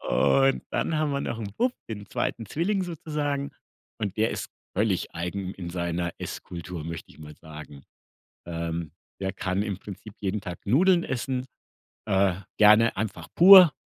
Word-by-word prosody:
Und 135 0 +3
dann 155 - 0
haben 155 -2 +1
wir 140 - 0
noch 115 - -3
'n 105 -3 -5
Bub, 250 0 +2 0.2
den 105 -2 -6
2. 115 +2 -2
Zwilling 190 - 0
sozusagen. 145 -4 -3 0.5
Und 105 -3 -3
der 110 +1 +3
ist - - -5 0.3
völlig 100 -2 0
eigen 90 +3 -4
in 85 -2 -6
seiner 85 0 -2
Esskultur, 85 -2 -6
möchte 85 -1 -7
ich - - -18
mal 75 -1 -10
sagen. 75 -3 -11 0.6
Ähm, 85 -1 -3 0.3
der 95 0 -1
kann 95 0 -1
im 100 -3 -3
Prinzip 100 +1 -10
jeden 100 +1 -1
Tag 90 -2 -6
Nudeln 170 - +4
essen, 130 0 -2 0.6
äh, 95 -2 +3 0.2
gerne 110 +2 +6
einfach 105 +1 -4
pur, 185 -2 +10
105 Hz, 155 wpm, -26 LUFS, 90-140 Hz, 0.6 s, pur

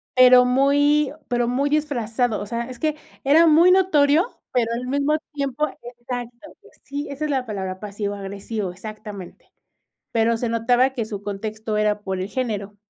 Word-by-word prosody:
Pero 250 0 +7
muy 285 +3 +3 0.2
pero 240 -1 0
muy 270 +4 0
disfrazado, 245 -6 0
o - - -4
sea, 235 +2 -3
es 250 -2 -9
que 310 -1 0 0.3
era 305 +5 +5
muy 330 +3 +6
notorio, 345 0 +3
pero 235 -2 +1
al 250 +2 -4
mismo 285 +3 +1 0.2
tiempo 280 +1 -1 0.2
exacto. 240 +2 -8
Pues, - - -21
sí, 285 +1 -5
esa 285 +2 -4
es 300 - -2
la 260 -2 0
palabra 190 -4 -5
pasivo-agresivo, 200 0 -4
exactamente. 210 0 -10 0.6
Pero 230 0 +2
se 235 +1 -2
notaba 240 +3 +2
que 250 -4 -3
su 205 -2 -6
contexto 215 +2 -4
era 210 0 +1
por 190 -2 -4
el 185 - -3
género. 205 -3 -3
240 Hz, 165 wpm, -22 LUFS, 210-280 Hz, 0.6 s, Pero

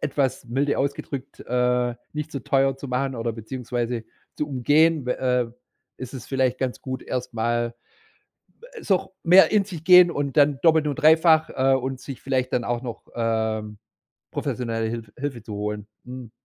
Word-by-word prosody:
etwas 135 -3 -1
milde 135 +4 0
ausgedrückt, 140 -1 -4
äh, 125 0 +1 0.2
nicht 150 +1 -4
so 140 - -4
teuer 135 +1 +1
zu 135 - -8
machen 135 +2 -1
oder, 115 -1 -2
beziehungsweise 120 0 -4 0.3
zu 150 - -2
umgehen, 145 +2 +2
we 125 - 0
äh, 125 -2 0 0.4
ist 130 -1 -8
es 130 -4 -8
vielleicht 130 -2 0
ganz 130 -2 -3
gut, 130 -1 -5
erst 125 -1 -4
mal 120 +1 -1 1.1
so, 195 - +2
ch - - -10 0.2
mehr 180 +3 +6
in 210 -2 +4
sich 175 -6 -8
gehen 180 -1 +8
und 145 -3 -3
dann 145 -2 +4
doppelt 160 -2 +4
und 145 - -2
dreifach, 160 +1 +5
äh, 135 0 +2
und 130 0 -4
sich 135 -3 -8
vielleicht 130 -1 -1
dann 120 - 0
auch 120 +1 -2
noch, 120 -3 -7
ähm, 110 -2 -1 0.5
professionelle 115 -3 -2
Hilf 115 -2 -6
Hilfe 130 -4 -4
zu 110 -1 -8
holen. 105 0 -4 0.2
Mhm. 125 -2 -9
130 Hz, 170 wpm, -24 LUFS, 120-145 Hz, 1.1 s, gehen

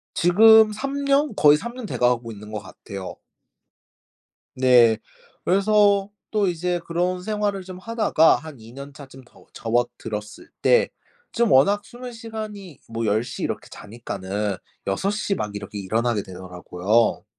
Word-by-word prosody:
지금 220 +5 +6
3 275 +6 -4
년? 280 -3 +2
거의 150 0 +6
3 235 +9 -7
년 250 -4 -7
돼 - - -4
가고 120 -2 +1
있는 105 0 -11
것 105 -1 -4
같아요. 95 0 -9 1.4
네. 125 -4 +5 0.5
그래서 200 +1 +3 0.2
또 210 -3 +1
이제 175 +1 -1
그런 180 +1 0
생활을 205 -2 -2
좀 185 0 -9
하다가 215 -6 +3
한 155 -5 -10
2 115 +2 -13
년차쯤 140 -1 -11
더 - - -21
접어들었을 115 -2 -3
때 485 -1 +4 0.4
좀 235 -1 +2
워낙 200 +10 +4
수면 245 +2 -9
시간이 215 - -8
뭐 115 0 -3
10 110 +2 +2
시 - - -6
이렇게 - - -4
자니까는 105 -2 -5 0.3
6 190 - 0
시 205 -2 -1
막 105 -1 -4
이렇게 105 0 -7
일어나게 110 +2 -1
되더라고요. 90 +4 -1
155 Hz, 250 characters per minute, -23 LUFS, -, 1.4 s, 지금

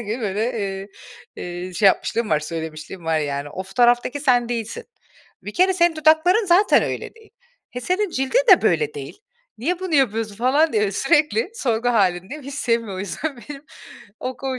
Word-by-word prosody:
gün 225 +2 -4
böyle, 215 +3 -1
iii, 195 -1 -4 0.5
eee, 180 +1 -6
şey 205 +2 +3
yapmışlığım 220 +3 +1
var, 150 - +2
söylemişliğim 160 +2 -7
var 160 -1 +1
yani. 145 -1 -3
O 190 - -6
fotoğraftaki 240 +7 +1
sen 245 -4 +2
değilsin, 240 - -4 0.6
bir - - -7
kere 370 +1 +4
senin 345 -3 +2
dudakların 320 +7 +3
zaten 360 +4 +4
öyle - - -4
değil, 445 -1 -20 0.4
he, 250 - -6
senin 370 +5 -1
cildin 270 - +1
de 370 - +5
böyle 445 -1 +1
değil, 430 - -8 0.4
niye 345 +9 -2
bunu 370 -4 -3
yapıyorsun 225 -5 +1
falan 280 +7 +2
diye 210 -2 +1
sürekli 285 - +1
sorgu 240 - -1
hâlindeyim. 200 +4 0
Hiç 275 +1 -8
sevmiyor 230 -7 -1
o - - -6
yüzden 275 - -4
benim 280 +3 -10 0.6
o 255 0 -4
ko 265 -1 -4
245 Hz, 175 wpm, -21 LUFS, 195-310 Hz, 0.6 s, de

